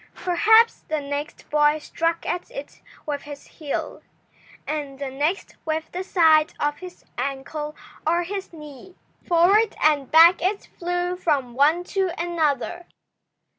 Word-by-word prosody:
Perhaps 445 +6 +5
the 310 - -1
next 285 +1 -5
boy 295 0 +4
struck 330 +2 -2
at 355 - -3
it - - -9 0.2
with 290 -2 -3
his 290 -1 -10
heel, 300 -4 -5 0.6
and 290 -3 -4
the 275 -1 -5
next 300 +8 -2
with 320 0 -3
the 365 +1 -4
side 320 -4 +4
of 295 0 -1
his 365 -1 -11
ankle 295 +2 -4 0.3
or 340 +2 +2
his 390 +2 -5
knee. 300 +2 -12 0.3
Forward 390 +6 +4
and 290 -4 +2
back 335 +3 +7
it 395 +3 -1
flew 355 +1 -1
from 285 -9 0
one 300 +7 +3
to 380 0 -1
another. 340 0 -1
320 Hz, 135 wpm, -23 LUFS, 295-355 Hz, 0.6 s, back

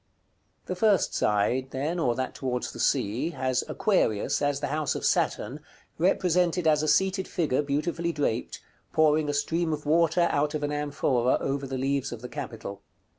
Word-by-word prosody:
§ - - -43
CVIII. - - -44
The 185 - -3
first 200 -2 +2
side, 105 +6 +1
then, 150 +7 -2
or 125 -7 +1
that 130 +1 -3
towards 125 -2 -3
the - - -10
Sea, 115 +10 +1
has 130 -1 0
Aquarius, 110 - +1
as 145 -1 +1
the 145 -1 -3
house 155 -1 -1
of - - -3
Saturn, 130 +8 0 0.4
represented 180 -1 +2
as 155 -1 +4
a 155 - -1
seated 190 +3 +2
figure 150 -6 0
beautifully 165 +4 -1
draped, 145 -7 -2 0.3
pouring 155 -1 +3
a - - 0
stream 165 +3 0
of 150 -1 -4
water 165 +2 +3
out 150 +1 0
of 150 - -3
an 145 - -1
amphora 140 -4 +1
over 135 0 -2
the 135 0 -4
leaves 135 0 -1
of 120 -1 -8
the 125 - -6
capital. 115 -8 -7
145 Hz, 180 wpm, -27 LUFS, 130-165 Hz, 0.4 s, as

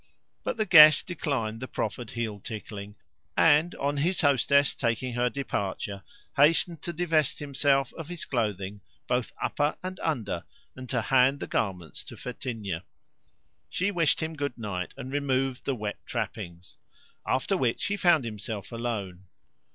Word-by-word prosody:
But - - -2
the 215 - +1
guest 155 -5 +9
declined 135 -11 -2
the 130 - -5
proffered 110 0 -3
heel 110 -3 -3
tickling, 105 -1 -7 0.4
and, 160 +2 +5
on 145 +1 -1
his 170 +6 +1
hostess 140 0 +4
taking 120 +1 -1
her 120 +1 +2
departure, 100 -7 -3 0.3
hastened 160 +2 +4
to 170 - -3
divest 160 -4 +1
himself 140 -2 +1
of 165 -3 -7
his 175 -1 -4
clothing, 105 -5 -2 0.2
both 125 -1 0
upper 145 +1 0
and 185 0 -5
under, 145 -9 -2 0.3
and 130 -1 -9
to 120 -4 0
hand 135 +3 +4
the - - -3
garments 90 -6 -2
to - - -10
Fetinia. 115 -8 -4 0.9
She 185 - 0
wished 165 -4 +2
him 160 0 -3
good 145 -4 -3
night, 100 -6 -4
and 130 - -6
removed 135 -2 0
the 135 - 0
wet 105 -3 -5
trappings; 85 +1 -5 0.5
after 130 +9 +1
which 125 -10 0
he 200 +1 0
found 170 -9 +4
himself 105 -1 -5
alone. 105 -6 -4
130 Hz, 150 wpm, -28 LUFS, 110-150 Hz, 0.9 s, guest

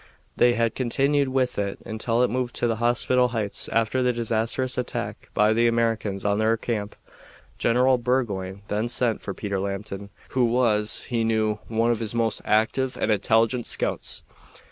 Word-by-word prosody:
They 120 0 +4
had 115 -1 +1
continued 135 +3 +1
with 130 -3 0
it 100 -1 -2
until 115 +2 0
it 125 - +1
moved 125 -1 -2
to - - -1
the 115 -1 0
hospital 120 +2 +2
heights 110 -4 -2
after 115 +3 +1
the 125 0 +3
disastrous 120 +2 -1
attack 125 - -4
by 105 +1 +4
the 115 +1 +3
Americans 115 -4 0
on 100 0 +1
their 110 +1 +2
camp. 105 -3 -3 0.6
General 125 +2 +3
Burgoyne 100 -6 -2
then 105 +3 -1
sent 120 -1 0
for - - -5
Peter 100 -2 -3
Lambton, 100 0 -5 0.2
who 130 -2 +2
was, 115 -3 +2
he 120 -2 0
knew, 110 -1 0
one 115 +1 +1
of 115 - -1
his 115 0 -3
most 115 -2 0
active 115 +5 +1
and - - 0
intelligent 115 +3 +2
scouts. - - -1
115 Hz, 165 wpm, -24 LUFS, 105-125 Hz, 0.6 s, They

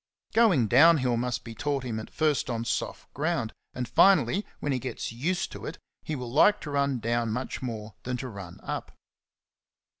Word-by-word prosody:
Going 195 - +4
down 155 +9 +7
hill 125 -3 +1
must 120 -1 -2
be 115 - -8
taught 140 +3 -2
him 115 -3 -3
at 110 - -8
first 155 -4 +1
on 115 -1 -2
soft 115 - -3
ground, 150 -6 -1 0.2
and 125 -1 -3
finally, 195 - +4
when 145 - -1
he 130 - 0
gets 130 -2 -4
used 175 +10 -1
to - - -7
it, 160 - -6 0.2
he 155 - -4
will 125 -3 -5
like 205 +10 +5
to 150 - -6
run 140 -2 +1
down 115 0 0
much 125 +4 -3
CHAPTER - - -6
VIII. - - -2
47 115 - -4
more 105 0 -13
than 125 0 -3
to 130 - -5
run 100 -6 -9
up. - - -5
130 Hz, 210 wpm, -28 LUFS, 115-155 Hz, 0.2 s, down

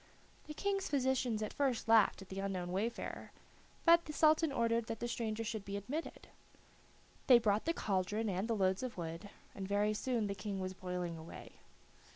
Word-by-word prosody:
The 300 - -7
King's 395 +1 -1
physicians 260 -5 +1
at 210 - -4
first 265 -6 0
laughed 220 -3 +5
at 190 - -18
the 195 - -5
unknown 185 -3 -3
wayfarer, 215 +6 -3 0.5
but 335 0 +6
the 305 - -6
Sultan 310 +1 +4
ordered 230 -2 +1
that 225 - -4
the 240 - -2
stranger 225 -2 -2
should 220 -2 -4
be 200 0 -4
admitted. 270 - -5 1.0
They 250 - +9
brought 215 -2 +1
the 330 - +1
cauldron 205 +3 -1
and 195 +2 -1
the 230 - 0
loads 190 -2 +1
of 255 -5 -5
wood, 165 +3 -5 0.2
and 195 -1 -5
very 205 +1 +2
soon 235 0 -1
the 200 - -2
King 200 0 -4
was 185 0 -3
boiling 180 -2 -4
away. 160 - -10
215 Hz, 185 wpm, -35 LUFS, 195-250 Hz, 1.0 s, They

